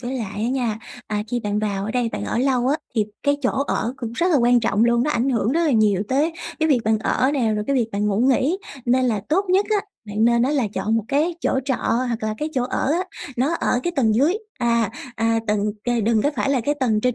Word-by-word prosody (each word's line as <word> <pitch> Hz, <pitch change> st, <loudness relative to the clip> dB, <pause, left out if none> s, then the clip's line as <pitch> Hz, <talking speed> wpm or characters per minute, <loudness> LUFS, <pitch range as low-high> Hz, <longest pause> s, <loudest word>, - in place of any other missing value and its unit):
với 250 Hz, +1 st, -4 dB
lại 210 Hz, -3 st, -5 dB
á 235 Hz, -, 0 dB
nha, 245 Hz, -5 st, -1 dB, 0.3 s
à, 210 Hz, -1 st, -2 dB
khi 240 Hz, +1 st, -1 dB
bạn 210 Hz, -1 st, -1 dB
vào 200 Hz, -2 st, -2 dB
ở 215 Hz, -, -3 dB
đây, 245 Hz, -1 st, 0 dB
bạn -, -, -3 dB
ở -, -, -2 dB
lâu 255 Hz, -1 st, +1 dB
á 290 Hz, -, +2 dB, 0.2 s
thì 215 Hz, -2 st, +2 dB, 0.2 s
cái 285 Hz, 0 st, +2 dB
chỗ 255 Hz, -, +2 dB, 0.2 s
ở 235 Hz, -, -1 dB
cũng 235 Hz, -3 st, -5 dB
rất 340 Hz, +8 st, 0 dB
là 305 Hz, -, +4 dB
quan 240 Hz, -1 st, +4 dB
trọng 220 Hz, 0 st, +2 dB
luôn, 235 Hz, 0 st, +3 dB
nó 300 Hz, -, 0 dB
ảnh 240 Hz, +3 st, +1 dB
hưởng 230 Hz, -1 st, +1 dB
rất 335 Hz, -, +2 dB
là 310 Hz, -, +2 dB
nhiều 210 Hz, -4 st, +3 dB
tới 295 Hz, +5 st, +1 dB, 0.3 s
cái 315 Hz, -, +2 dB
việc 275 Hz, -, +4 dB
bạn 220 Hz, 0 st, +2 dB
ở 260 Hz, +4 st, +1 dB
nè, 235 Hz, -6 st, +1 dB
rồi 210 Hz, -, -2 dB
cái 275 Hz, -, +1 dB
việc 235 Hz, -3 st, +1 dB
bạn 205 Hz, +1 st, 0 dB
ngủ 205 Hz, 0 st, 0 dB
nghỉ. 270 Hz, +8 st, +2 dB, 0.3 s
Nên 255 Hz, +1 st, +2 dB
là 220 Hz, -5 st, +1 dB
tốt 375 Hz, +6 st, +2 dB
nhất 385 Hz, +2 st, +3 dB
á, 425 Hz, -, +4 dB, 0.3 s
bạn 210 Hz, +2 st, 0 dB
nên 235 Hz, 0 st, +4 dB
á, 260 Hz, -, +2 dB
là 275 Hz, -7 st, +1 dB
chọn 215 Hz, +4 st, 0 dB
một 220 Hz, -, -1 dB
cái 310 Hz, +5 st, +1 dB
chỗ 265 Hz, -, +1 dB
trọ 265 Hz, -2 st, 0 dB
hoặc 240 Hz, 0 st, 0 dB
là 215 Hz, 0 st, -1 dB
cái 305 Hz, -, -2 dB
chỗ 250 Hz, -, +1 dB
ở 265 Hz, +3 st, -1 dB
á 360 Hz, +3 st, 0 dB, 0.3 s
nó 280 Hz, +7 st, +1 dB
ở 245 Hz, -, 0 dB
cái 350 Hz, -, -1 dB
tầng 225 Hz, -5 st, +3 dB
dưới, 290 Hz, -, +3 dB, 0.2 s
à, 235 Hz, -3 st, +1 dB, 0.2 s
à, 225 Hz, 0 st, +1 dB
tầng, 210 Hz, -1 st, +1 dB, 0.2 s
kề 240 Hz, -1 st, +1 dB
đừng 220 Hz, 0 st, +2 dB
có 290 Hz, -, +2 dB
phải 220 Hz, +6 st, 0 dB
là 265 Hz, -3 st, +2 dB
cái 290 Hz, +6 st, 0 dB
tầng 220 Hz, -4 st, +2 dB
trên 250 Hz, +1 st, +1 dB
240 Hz, 275 wpm, -22 LUFS, 220-275 Hz, 0.3 s, là